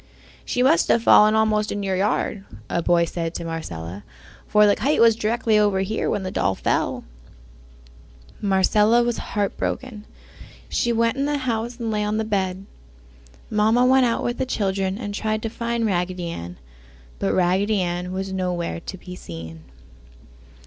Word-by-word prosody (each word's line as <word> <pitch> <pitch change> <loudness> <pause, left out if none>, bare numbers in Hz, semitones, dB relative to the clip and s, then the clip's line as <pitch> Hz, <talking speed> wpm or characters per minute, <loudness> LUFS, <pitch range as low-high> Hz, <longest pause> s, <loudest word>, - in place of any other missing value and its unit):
"She 250 - 0
must 300 +6 +4
have 230 - +3
fallen 215 -1 +6
almost 215 -1 +2
in 205 - -3
your 190 -1 -1
yard!" 200 +1 -1 0.3
a 170 - +1
boy 170 0 +3
said 165 0 -4
to 170 - -4
Marcella, 95 - -6 0.4
"for 210 0 +5
the 205 - +4
kite 280 +8 0
was 230 -1 +6
directly 225 -1 +1
over 205 -2 +2
here 210 +3 -1
when 205 - -1
the 185 - -4
doll 95 - 0
fell!" - - -1 1.4
Marcella 210 +4 +3
was 240 -1 -1
heartbroken. 210 +2 -3 0.6
She 240 - 0
went 230 +2 +1
in 275 - 0
the 295 0 0
house 235 -2 -3
and 230 -3 -3
lay 210 -1 0
on 210 +1 -1
the 220 - 0
bed. 190 -2 -2 0.9
Mamma 220 +4 +3
went 260 0 +5
out 230 - -1
with 240 0 -2
the - - 0
children 195 -4 -1
and 205 -3 -5
tried 215 +1 -2
to 225 - -2
find 235 0 -2
Raggedy 180 -3 -1
Ann, 85 - -7 0.6
but 95 - 0
Raggedy 190 +4 +2
Ann 175 0 -3
was 190 +1 -4
nowhere 180 -3 -2
to 190 - -8
be 180 0 -10
seen. 80 - -9
205 Hz, 165 wpm, -23 LUFS, 180-225 Hz, 1.4 s, fallen